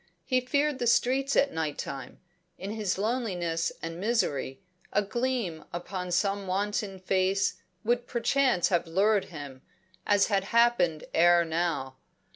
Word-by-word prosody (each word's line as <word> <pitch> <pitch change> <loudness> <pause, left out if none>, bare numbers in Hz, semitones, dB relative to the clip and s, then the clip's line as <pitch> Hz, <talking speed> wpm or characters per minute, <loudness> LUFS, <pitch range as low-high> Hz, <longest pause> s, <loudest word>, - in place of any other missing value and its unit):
He 255 0 +2
feared 285 +2 0
the 240 - 0
streets 265 +4 +2
at 280 - +3
night 155 -2 -2
time; 135 -2 -6 0.4
in 195 +2 -5
his 210 -4 -1
loneliness 190 -7 -1
and 165 +1 -5
misery, 185 - -1 0.3
a 205 - +2
gleam 230 -7 -2
upon 180 +1 -5
some 195 +2 0
wanton 200 +1 -1
face 190 +1 0 0.2
would 240 +2 0
perchance 240 -4 +2
have 175 -2 +1
lured 200 +4 +2
him, 145 -6 -9 0.5
as 205 -1 +4
had 195 -2 0
happened 220 -9 +3
ere 175 +1 +5
now. 160 -5 -2
195 Hz, 135 wpm, -28 LUFS, 170-235 Hz, 0.5 s, ere